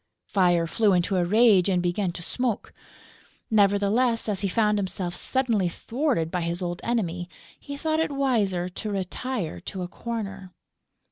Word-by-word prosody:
Fire 175 -4 +3
flew 205 +4 +2
into 180 +2 +2
a 180 - +3
rage 205 0 +5
and 185 -2 +2
began 175 +1 0
to 175 - -6
smoke. 245 +2 -2 0.8
Nevertheless, 215 +4 +3
as 205 -3 0
he 200 - 0
found 210 +1 +2
himself 185 -2 -3
suddenly 225 -3 0
thwarted 230 - -1
by 180 - -1
his 170 +1 -2
old 175 -1 -3
enemy, 180 -7 -1 0.3
he 285 0 -7
thought 315 +1 0
it 320 - 0
wiser 220 -11 +1
to 195 +4 -6
retire 195 - -3
to 185 - -5
a - - -4
corner. 195 -3 -6
195 Hz, 155 wpm, -26 LUFS, 180-230 Hz, 0.8 s, rage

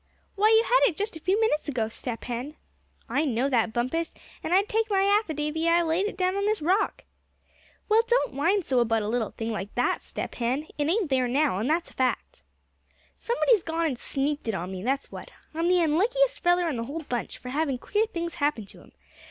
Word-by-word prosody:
"Why, 420 +2 +3
you 445 0 +6
had - - +4
it 340 - -6
just 415 -2 -3
a - - -7
few 375 +6 +1
minutes 440 -10 +1
ago, 235 -6 -1
Step 230 +1 -6
Hen!" 250 +5 -5 0.5
"I 275 +6 +1
know 265 -2 0
that, 230 -3 +2
Bumpus; 255 +9 -2 0.3
and - - -3
I'd 390 +3 +4
take 445 +1 0
my 390 -1 +2
affidavy 325 -6 +1
I 340 +1 +4
laid 335 +5 +1
it 425 - -6
down 370 0 +1
on 400 0 0
this 430 0 +1
rock." 365 +7 0 0.8
"Well, 435 +1 +5
don't 485 - +2
whine 345 +9 +1
so 260 -5 +1
about 225 -2 +1
a - - -3
little 225 0 -1
thing 225 0 -5
like 205 -2 -5
that, 245 - +1
Step - - -6
Hen; 250 +5 -1
it 295 -1 -1
ain't 370 -4 0
there 255 -1 +2
now, 270 -5 +1
and 230 +7 -1
that's 330 +2 0
a - - -19
fact." 260 -1 -2 0.7
"Somebody's 475 -2 +2
gone 330 0 -2
and 265 -6 -2
sneaked 285 0 -2
it 220 - 0
on 180 +2 -4
me, 185 -1 -5
that's 270 +6 -2
what. - - -9 0.2
I'm 330 +2 0
the 360 -1 +4
unluckiest 485 +11 +2
feller 350 0 +3
in 295 -7 -2
the 230 - -3
whole 310 +6 -5
bunch, 245 -4 -4
for 250 - -9
havin' 280 -1 0
queer 425 - 0
things 340 -5 -4
happen 285 -7 0
to - - -15
him. - - -19
310 Hz, 220 wpm, -26 LUFS, 250-385 Hz, 0.8 s, you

